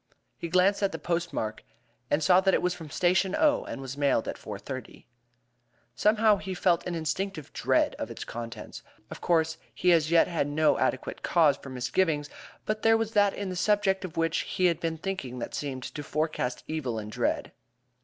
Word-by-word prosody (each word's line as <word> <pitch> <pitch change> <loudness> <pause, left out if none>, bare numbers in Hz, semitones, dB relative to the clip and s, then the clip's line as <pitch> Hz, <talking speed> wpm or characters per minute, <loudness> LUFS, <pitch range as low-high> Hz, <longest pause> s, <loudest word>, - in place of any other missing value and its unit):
He 170 - -6
glanced 185 +4 +3
at 200 -1 +2
the - - -4
postmark, 170 -11 -2 0.5
and 150 +2 +1
saw 185 +2 +6
that 190 0 +3
it - - +1
was 180 0 +1
from 165 -4 -9
Station 180 +4 +2
O 300 -2 +3
and - - -6
was 135 0 -6
mailed 140 -5 +1
at - - -3
4:30. 115 +4 -8 0.9
Somehow, 210 - +4
he 190 -1 -5
felt 175 -1 +2
an 175 - -2
instinctive 160 0 -3
dread - - +2
of - - -4
its - - -6
contents. 115 -1 -7 0.3
Of - - -8
course, 160 -1 +1 0.2
he 180 - +3
as 160 -2 +4
yet 170 0 +5
had 165 -5 -1
no 150 +1 +2
adequate - - -1
cause 155 -5 +4
for 140 - -11
misgivings; 145 +4 0 0.3
but 215 0 -2
there 225 0 +5
was 225 -1 -2
that 205 -2 +3
in 200 -2 -4
the 185 - -4
subject 195 0 +2
of 180 -4 -7
which 165 0 +1
he 185 - -1
had 170 -2 +3
been 165 -1 -2
thinking 155 -8 -4
that 120 - -5
seemed 135 -3 -4
to 150 - -6
forecast 150 -4 -2
evil 140 -8 -3
and 105 -1 -6
dread. - - -1
165 Hz, 195 wpm, -28 LUFS, 145-190 Hz, 0.9 s, saw